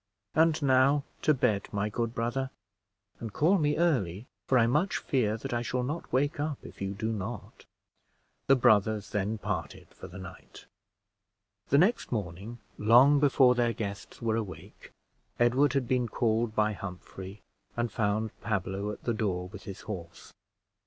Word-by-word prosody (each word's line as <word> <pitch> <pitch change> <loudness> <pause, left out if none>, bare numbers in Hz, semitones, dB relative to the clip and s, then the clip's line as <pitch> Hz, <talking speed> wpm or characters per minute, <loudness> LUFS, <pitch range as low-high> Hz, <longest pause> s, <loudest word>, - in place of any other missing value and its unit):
And 160 0 +3
now 135 +1 +4 0.2
to - - +4
bed, 110 -8 +1
my 100 0 -1
good 115 +2 -3
brother; 120 +3 -1 0.7
and 115 -2 -6
call 175 - +3
me 150 -1 +1
early, 120 - +1 0.2
for 130 - +4
I 115 - +5
much 150 +11 +1
fear 110 -5 0
that 115 - -6
I 120 - 0
shall 125 +1 -2
not 150 +7 -4
wake 140 +4 +1
up 150 -1 -2
if - - -12
you 100 0 -3
do 110 +3 -2
not." 110 +3 -7 0.8
The 135 - +6
brothers 110 -4 +3
then 105 +2 -1
parted 105 -5 -5
for - - -11
the 90 - -11
night. 95 -2 -11 1.0
The 140 - +4
next 195 +10 +2
morning, 105 +1 -4 0.2
long 125 +7 +6
before 135 -3 +5
their 120 -1 +1
guests 100 -1 -6
were 110 -1 +1
awake, 105 -5 -7 0.5
Edward 125 +5 +3
had 135 -3 0
been 125 -2 +1
called 110 0 0
by 105 0 +2
Humphrey, 95 +1 -9 0.3
and 120 -2 -1
found 105 0 0
Pablo 100 -1 -2
at 105 - -7
the 120 - 0
door 95 -5 -2
with 100 +1 -11
his 100 0 -8
horse. 85 -5 -8
115 Hz, 160 wpm, -29 LUFS, 100-130 Hz, 1.0 s, The